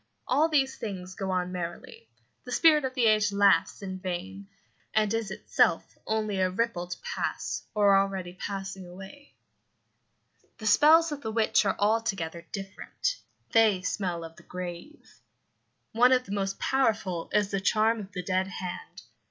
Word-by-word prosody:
All 295 Hz, +6 st, +3 dB
these 270 Hz, -4 st, +1 dB
things 185 Hz, -5 st, -6 dB
go 190 Hz, +1 st, -4 dB
on 180 Hz, -1 st, -1 dB
merrily. 180 Hz, -, -7 dB, 0.3 s
The -, -, -9 dB
spirit 305 Hz, -4 st, +5 dB
of 255 Hz, -1 st, -4 dB
the 250 Hz, -3 st, +2 dB
age 215 Hz, -1 st, +4 dB
laughs 200 Hz, 0 st, +3 dB
in 190 Hz, -1 st, -5 dB
vain, 190 Hz, +2 st, -5 dB, 0.5 s
and 215 Hz, -1 st, +2 dB
is 225 Hz, -3 st, -1 dB
itself 190 Hz, -, +1 dB
only 215 Hz, -3 st, -1 dB
a 185 Hz, 0 st, +2 dB
ripple 190 Hz, -2 st, -2 dB
to 180 Hz, -, -6 dB
pass, 485 Hz, -1 st, -3 dB
or 205 Hz, -2 st, +5 dB
already 195 Hz, -2 st, 0 dB
passing, 195 Hz, -1 st, -6 dB
away. 195 Hz, +11 st, -12 dB, 1.2 s
The 220 Hz, -, -9 dB
spells 310 Hz, +8 st, +6 dB
of 290 Hz, -1 st, -5 dB
the 220 Hz, -, -4 dB
witch 220 Hz, -1 st, +2 dB
are 195 Hz, -, +1 dB
altogether 195 Hz, -6 st, -1 dB
different; 195 Hz, -, -4 dB, 0.3 s
they 215 Hz, -5 st, +4 dB
smell 180 Hz, -4 st, -2 dB
of 165 Hz, 0 st, -10 dB
the -, -, -14 dB
grave. 180 Hz, -, -9 dB, 0.7 s
One 245 Hz, +3 st, +5 dB
of 255 Hz, -1 st, +4 dB
the -, -, -9 dB
most 195 Hz, -1 st, -2 dB
powerful 210 Hz, -10 st, 0 dB
is 205 Hz, -1 st, +1 dB
the 195 Hz, -1 st, -1 dB
charm 220 Hz, +3 st, +2 dB
of 200 Hz, -1 st, -8 dB
the 180 Hz, -3 st, -5 dB
dead 185 Hz, +1 st, 0 dB
hand. 180 Hz, -1 st, -7 dB
200 Hz, 160 wpm, -28 LUFS, 185-225 Hz, 1.2 s, spells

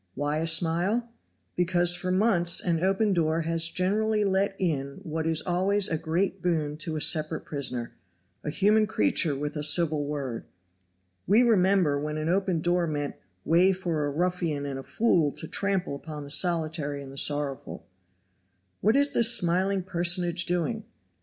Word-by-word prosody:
why 145 Hz, +1 st, -2 dB
a 165 Hz, -, -1 dB
smile? 175 Hz, +8 st, +1 dB, 0.5 s
Because 175 Hz, 0 st, +2 dB
for 185 Hz, +1 st, -4 dB
months 185 Hz, -3 st, +2 dB
an 170 Hz, -2 st, 0 dB
open 195 Hz, +2 st, +1 dB
door 165 Hz, -1 st, 0 dB
has 165 Hz, 0 st, 0 dB
generally 210 Hz, +4 st, 0 dB
let 195 Hz, 0 st, 0 dB
in 140 Hz, -6 st, -2 dB
what 160 Hz, 0 st, -3 dB
is 160 Hz, -1 st, +1 dB
always 190 Hz, +3 st, +1 dB
a 165 Hz, -, -1 dB
great 165 Hz, +5 st, -2 dB
boon 155 Hz, -4 st, -1 dB
to 155 Hz, +1 st, -4 dB
a 155 Hz, -, -3 dB
separate 155 Hz, -1 st, +1 dB
prisoner 125 Hz, -5 st, -2 dB, 0.5 s
a -, -, -3 dB
human 210 Hz, +7 st, +2 dB
creature 140 Hz, -, +1 dB
with 145 Hz, +2 st, -4 dB
a 150 Hz, -, -3 dB
civil 150 Hz, -1 st, +2 dB
word. 140 Hz, -5 st, -5 dB, 0.8 s
We 215 Hz, +6 st, +5 dB
remember 190 Hz, -9 st, +2 dB
when 150 Hz, +1 st, -4 dB
an 155 Hz, +1 st, -2 dB
open 185 Hz, -2 st, 0 dB
door 175 Hz, 0 st, +1 dB
meant 145 Hz, -2 st, -3 dB, 0.3 s
"way 180 Hz, +4 st, +4 dB
for 170 Hz, -5 st, -2 dB
a -, -, -2 dB
ruffian 165 Hz, -2 st, -2 dB
and 135 Hz, -1 st, -5 dB
a -, -, -6 dB
fool 165 Hz, -4 st, +1 dB
to 160 Hz, -, -7 dB
trample 195 Hz, -7 st, -2 dB
upon 150 Hz, 0 st, -8 dB
the 140 Hz, -, -5 dB
solitary 155 Hz, -4 st, +1 dB
and 135 Hz, 0 st, -4 dB
sorrowful!" 145 Hz, -3 st, -1 dB, 0.9 s
What 215 Hz, +2 st, +2 dB
is 285 Hz, +1 st, +3 dB
this 235 Hz, 0 st, +4 dB
smiling 185 Hz, +2 st, 0 dB
personage 175 Hz, -1 st, +1 dB
doing? 180 Hz, +6 st, -2 dB
170 Hz, 160 wpm, -26 LUFS, 150-190 Hz, 0.9 s, We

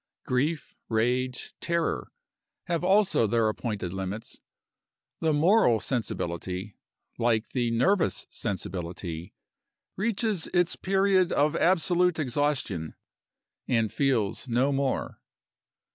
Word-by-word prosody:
Grief, 150 Hz, +5 st, -1 dB
rage, 125 Hz, +3 st, 0 dB
terror, 170 Hz, -1 st, -1 dB, 0.5 s
have 170 Hz, 0 st, -2 dB
also 190 Hz, -, +3 dB
their 115 Hz, +1 st, +2 dB
appointed 105 Hz, -5 st, -3 dB
limits. 95 Hz, +3 st, -5 dB, 0.8 s
The 160 Hz, -, +2 dB
moral 155 Hz, -, +4 dB
sensibility, 95 Hz, -4 st, -3 dB, 0.4 s
like 115 Hz, -1 st, +1 dB
the 120 Hz, -2 st, 0 dB
nervous 165 Hz, -, +2 dB
sensibility, 90 Hz, -1 st, -5 dB, 0.6 s
reaches 215 Hz, -3 st, 0 dB
its 175 Hz, -1 st, +3 dB
period 190 Hz, -1 st, +2 dB
of 145 Hz, +1 st, +2 dB
absolute 180 Hz, 0 st, +3 dB
exhaustion, 135 Hz, -, -1 dB, 0.7 s
and 115 Hz, -4 st, +1 dB
feels 130 Hz, -5 st, 0 dB
no 125 Hz, +4 st, +2 dB
more. 135 Hz, -1 st, -1 dB
130 Hz, 95 wpm, -27 LUFS, 110-170 Hz, 0.8 s, moral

